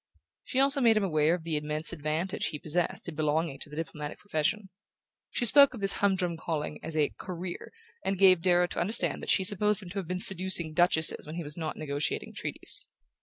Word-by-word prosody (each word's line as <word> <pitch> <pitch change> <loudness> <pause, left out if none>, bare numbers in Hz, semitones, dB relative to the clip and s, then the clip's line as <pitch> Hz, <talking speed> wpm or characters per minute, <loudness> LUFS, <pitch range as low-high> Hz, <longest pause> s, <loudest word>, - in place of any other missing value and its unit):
She 260 - -1
also 275 +1 +3
made 230 -3 +4
him 215 - +1
aware 155 -2 +2
of 175 - -9
the 160 -2 -2
immense 150 +2 -2
advantage 155 +4 -3
he 150 - -5
possessed 165 +5 -2
in 170 - -5
belonging 155 -1 -1
to 145 - -6
the 150 - -10
diplomatic 150 -2 -6
profession. 200 +3 -2 0.6
She 240 - -1
spoke 280 +2 +6
of - - -8
this 195 -1 +1
humdrum 185 -4 0
calling 160 -2 -4
as 160 -1 -4
a 150 -2 +1
Career, 180 -1 -7 0.3
and 195 0 -2
gave 185 -2 +5
Darrow 180 0 +3
to - - -6
understand 210 +7 +1
that - - -7
she 190 - +4
supposed 210 +2 +2
him 180 - -10
to 200 - -4
have 185 - -7
been 180 +1 -3
seducing 185 -4 +4
Duchesses 160 -3 +2
when 155 - -7
he 170 - -4
was 150 0 -5
not 160 -2 -5
negotiating 145 -1 -3
Treaties. - - -2
175 Hz, 210 wpm, -28 LUFS, 155-195 Hz, 0.6 s, spoke